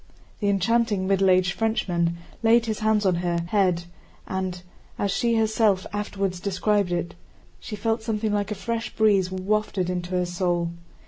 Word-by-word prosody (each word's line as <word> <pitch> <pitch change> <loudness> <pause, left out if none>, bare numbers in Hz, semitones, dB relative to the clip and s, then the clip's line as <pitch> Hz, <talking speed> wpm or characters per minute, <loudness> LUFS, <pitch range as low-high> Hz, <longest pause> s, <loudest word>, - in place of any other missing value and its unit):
The 205 - +1
enchanting, 205 0 +1
middle 195 0 +3
aged 180 -1 +3
Frenchman 175 -7 0 0.2
laid 230 +1 +4
his 220 -2 -2
hands 215 -1 +2
on 185 - +4
her 170 -1 0
head 185 -4 +2 0.4
and, 185 -1 -3 0.4
as 200 - 0
she 235 +3 +1
herself 220 -3 +2
afterward 200 -2 -2
described 200 0 +1
it, 175 0 -2 0.5
she 215 - -6
felt 225 +2 -1
something 220 -1 -1
like 205 0 0
a 210 - -2
fresh 230 +1 -4
breeze 200 -4 +3
wafted 190 -1 -1
into 175 -1 -3
her 180 0 +1
soul. 175 -1 -1
200 Hz, 155 wpm, -25 LUFS, 180-220 Hz, 0.5 s, laid